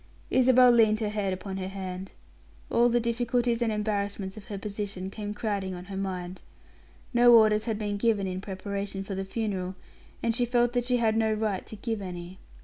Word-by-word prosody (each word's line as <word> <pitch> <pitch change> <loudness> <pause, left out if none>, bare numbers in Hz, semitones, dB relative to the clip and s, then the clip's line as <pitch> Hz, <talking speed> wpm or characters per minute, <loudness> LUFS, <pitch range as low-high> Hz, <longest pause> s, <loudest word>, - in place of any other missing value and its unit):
Isabel 255 -1 +6
leaned 220 -2 +4
her 215 - 0
head 205 -2 -1
upon 190 +1 -4
her 185 -1 -3
hand. 190 -1 -6 0.6
All 240 +1 +4
the 240 0 +3
difficulties 235 0 0
and 230 -2 +2
embarrassments 205 -2 -2
of 215 -2 -10
her 210 -4 -6
position 200 -2 -5
came 210 0 -5
crowding 200 -4 -2
on 180 0 -8
her 195 0 -7
mind. 185 -2 -4 0.7
No 240 0 +7
orders 215 -1 +5
had 225 -3 -1
been 205 -1 -2
given 210 -2 +2
in 185 0 -3
preparation 195 0 -4
for 195 - -6
the 195 0 -3
funeral, 190 -3 -3 0.5
and 230 - +2
she 245 - +1
felt 240 0 +2
that 245 -1 0
she 250 0 +2
had 225 -2 +2
no 220 -1 +2
right 210 -3 -2
to - - -8
give 220 0 -3
any. 180 0 -7
210 Hz, 195 wpm, -28 LUFS, 195-230 Hz, 0.7 s, No